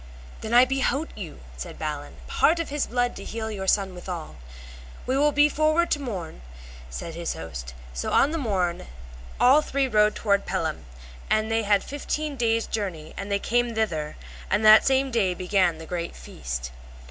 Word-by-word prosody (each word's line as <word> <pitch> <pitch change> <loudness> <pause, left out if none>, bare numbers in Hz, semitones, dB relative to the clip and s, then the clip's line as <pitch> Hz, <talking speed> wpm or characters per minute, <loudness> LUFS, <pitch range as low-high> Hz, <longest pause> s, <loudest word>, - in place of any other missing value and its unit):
Then 220 - -5
I 245 +2 +7
behote 270 +4 -1
you, - - -8 0.2
said - - -7
Balin, - - -5
part 335 - +3
of 335 - -3
his 290 0 -1
blood 245 0 0
to - - -7
heal 220 -1 -4
your 190 -2 -5
son 195 -1 +2
withal. 175 - -7 0.7
We 260 - 0
will 295 +2 +4
be 290 +1 +5
forward 310 +3 +2
to 290 - +2
morn, 185 - -5 0.5
said 65 - -6
his 170 0 -3
host. 65 -6 -7 0.2
So - - -3
on 280 - +4
the 330 - -2
morn 185 - 0
they - - -9
rode - - -14 0.5
all 270 +5 +6
three 275 -2 0
toward 210 -3 +2
Pellam, 165 - -2 0.4
and 215 +1 +1
they 225 0 +2
had 205 -2 +2
fifteen 295 +1 -3
days' 230 -2 +1
journey 180 -8 -4
or 195 - -5
they 200 0 0
came 240 +2 0
thither; 160 -9 -1 0.3
and 210 +3 +1
that 215 0 +8
same 270 0 +2
day 195 -6 +1
began 180 -2 +1
the 160 - -9
great 170 0 -4
feast. 60 0 -6
215 Hz, 180 wpm, -25 LUFS, 175-265 Hz, 0.7 s, that